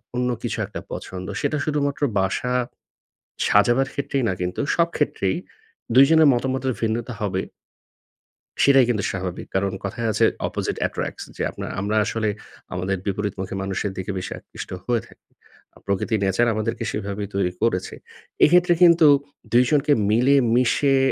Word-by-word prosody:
অন্য 125 0 0
কিছু - - -2
একটা - - -7
পছন্দ। 95 0 -6
সেটা 155 - 0
শুধুমাত্র 145 -2 -1 0.2
বাসা 95 +6 -1 0.9
সাজাবার 120 +6 +4
ক্ষেত্রেই 140 -1 -2
না - - 0
কিন্তু 90 +6 -2
সব 170 0 +3
ক্ষেত্রেই 95 -10 0 0.6
২ 135 +2 +9
জনের 160 -2 +6
মতামতের 130 +1 -1
ভিন্নতা 115 +2 -1
হবে। 95 -2 -1 1.2
সেটাই 135 -2 +6
কিন্তু 105 -4 0
স্বাভাবিক 90 -2 -5
কারণ 95 0 0
কথায় 115 +4 -2
আছে - - +2 0.2
opposite - - -3
attracts। - - -5
যে, - - -3
আপনার - - -7
আমরা 105 +2 -1
আসলে 110 +2 -1 0.5
আমাদের 95 +2 -1
বিপরীতমুখী 100 -1 -3
মানুষের 95 +1 -2
দিকে 95 +1 -4
বেশি 90 - -5
আকৃষ্ট - - -10
হয়ে 120 -2 0
থাকি। - - -22 0.6
প্রকৃতি, 100 +3 -1
nature 95 +5 +2
আমাদেরকে 110 +2 -2
সেভাবেই 100 -1 -4
তৈরি 95 -2 0
করেছে। 110 -6 0 0.5
এক্ষেত্রে 175 +2 +5
কিন্তু 170 -2 +7 0.5
২ 120 +2 +6
জনকে 145 0 +3 0.2
মিলেমিশে 125 +2 +3
115 Hz, 140 wpm, -23 LUFS, 100-135 Hz, 1.2 s, ২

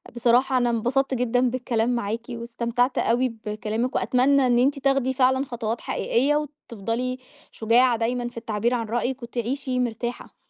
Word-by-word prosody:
بصراحة 245 +2 +3
أنا 245 -1 +2
انبسطت 255 +4 0
جدًا 245 0 +1
بالكلام 240 -2 -1
معاكِ 225 0 -2
واستمتعت 235 +1 -1
أوي 245 +2 +2 0.2
بكلامِك 215 +4 -2
وأتمنى 260 +1 +3
إن 240 0 +3
أنتِ 275 +2 +2
تاخدي 270 -1 +1
فعلًا 260 +1 +2
خطوات 230 -2 -4
حقيقية 275 +5 +1
وتفضلي 255 -4 -3 0.3
شجاعة 235 +2 +3
دايمًا 240 +1 -1
في 240 - -17
التعبير 230 +1 -1
عن 230 -2 -1
رأيِك 245 +2 -2
وتعيشي 250 +2 -3
مرتاحة. 240 0 -5
245 Hz, 145 wpm, -24 LUFS, 230-255 Hz, 0.3 s, بصراحة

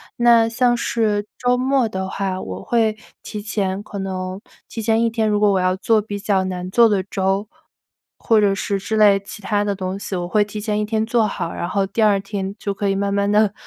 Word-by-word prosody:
那 235 -1 +5
像 240 +1 +2
是 215 -3 0
周 245 +1 +2
末 260 -1 +1
的 190 -2 -4
话， 190 -1 -3
我 95 0 -7
会 220 -2 +1 0.2
提 210 - -6
前 200 -2 -2
可 205 -1 -7
能 185 0 -4 0.3
提 225 - -6
前 225 +1 +2
1 230 - +1
天， 220 -1 0
如 210 -1 +1
果 210 -1 +4
我 190 - +2
要 185 0 +1
做 215 +3 +2
比 205 -1 -6
较 200 -1 +1
难 185 0 -4
做 235 +2 +5
的 200 -3 +1
粥， 195 +1 -1 0.7
或 220 -2 +3
者 200 -1 +3
是 200 0 -2
之 220 +3 -2
类 205 -2 +6
其 205 +1 -11
它 205 0 0
的 205 -1 -1
东 190 0 -4
西， 200 - -5
我 175 -1 -3
会 210 +3 +3
提 210 +1 -7
前 210 0 -1
1 - - 0
天 220 0 0
做 230 -1 +2
好， 175 -4 -4
然 175 - -4
后 200 -1 +1
第 200 +4 -2
2 210 -2 +4
天 195 0 -5
就 200 -2 -3
可 200 0 -2
以 195 - +1
慢 200 0 -1
慢 200 0 +1
地 210 -1 +3
205 Hz, 235 characters per minute, -20 LUFS, 195-220 Hz, 0.7 s, 类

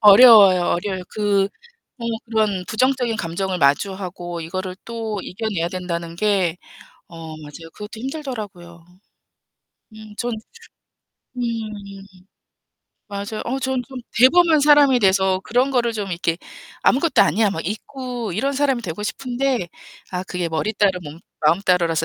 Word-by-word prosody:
어려워요, 205 -4 +8
어려워요. 185 +1 -3
그 200 -2 +1 0.5
어 240 - -8 0.2
그런 215 -5 0
부정적인 255 0 +1
감정을 185 0 -2
마주하고 175 +3 0
이거를 185 +3 -4
또 225 -3 -4
이겨내야 190 -4 -3
된다는 170 -2 -5
게 190 -4 +1 0.5
어, 170 - -14 0.2
맞아요. 155 +2 -11
그것도 210 +1 -9
힘들더라고요. 215 - -6 1.1
음, 215 -1 -12
전 240 0 -2 1.1
음. - - -2 1.7
맞아요. 205 +1 -5
어 255 +3 -1
저는 260 -1 -1
좀 265 -1 -7 0.2
대범한 320 +4 +6
사람이 285 -3 +6
돼서 190 -2 +3
그런 250 +4 +1
거를 240 -3 +1
좀 205 -3 -4
이렇게 170 -1 -1 0.5
'아무것도 285 +2 +4
아니야.' 220 0 +2
막 165 -4 -4
잊고 240 +1 -5
이런 270 +10 0
사람이 270 -3 +1
되고 185 +1 -5
싶은데 250 -2 -2 0.4
아, 180 0 -3
그게 180 -3 -3
머리 160 +7 -1
따로 195 -3 +2
몸 150 +1 -9 0.2
마음 160 +4 +3
따로라서 170 -4 +2
205 Hz, 295 characters per minute, -21 LUFS, 180-245 Hz, 1.7 s, 어려워요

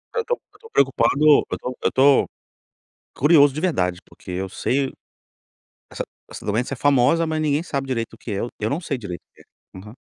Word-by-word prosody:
Eu 465 - +1
estou 485 +1 -2 0.2
eu - - -20
estou 455 -1 -16
preocupado 135 +2 +2
eu 150 -2 +6
estou 125 0 -5
eu - - +3
estou 135 +1 +4 0.9
curioso 145 -1 +5
de 155 - -4
verdade, 90 - 0
porque 90 - -12
eu 95 +1 -3
sei 135 +6 -1 1.0
essa - - -4 0.3
essa - - -10
doença 115 +6 -1
é - - -6
famosa, 145 +4 +3
mas 155 0 -2
ninguém 150 +1 +1
sabe 140 -5 -3
direito 115 -3 -3
o - - -13
que 115 - -8
é, 100 - -2
eu 120 - -2
eu 110 +1 -1
não 160 +7 -2
sei 140 -5 -3
direito 95 -7 -7
o - - -58
que - - -20
é. 95 - -17
Aham. 105 +5 -12
135 Hz, 215 wpm, -22 LUFS, 115-150 Hz, 1.0 s, eu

